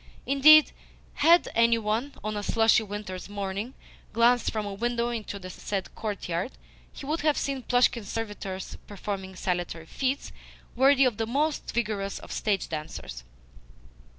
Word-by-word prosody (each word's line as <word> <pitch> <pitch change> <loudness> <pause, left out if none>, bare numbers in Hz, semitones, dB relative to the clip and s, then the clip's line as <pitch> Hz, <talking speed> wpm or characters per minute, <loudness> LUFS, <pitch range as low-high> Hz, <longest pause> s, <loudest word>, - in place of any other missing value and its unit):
Indeed, 300 +3 +7 0.4
had 335 +4 +5
any 230 0 +4
one, 225 +6 -2
on 215 0 -3
a 205 - -2
slushy 225 +2 +3
winter's 205 -3 -6
morning, 200 +4 -4 0.4
glanced 235 +1 +4
from 215 -1 -2
a 200 - -4
window 235 +3 -1
into 220 -4 -4
the 185 -1 -8
said 195 +1 -4
courtyard, 200 -1 -3 0.4
he - - -9
would 310 +4 -1
have 300 -1 +2
seen 275 -1 -2
Plushkin's 245 -4 +2
servitors 205 -4 -5
performing 195 -1 -5
saltatory 175 -3 -3
feats 265 - -2 0.4
worthy 270 +2 +5
of 240 -5 +1
the 225 - -1
most 290 +5 -1
vigorous 210 -4 -2
of - - -11
stage 200 -4 -1
dancers. 150 - -6
220 Hz, 145 wpm, -27 LUFS, 195-250 Hz, 0.4 s, Indeed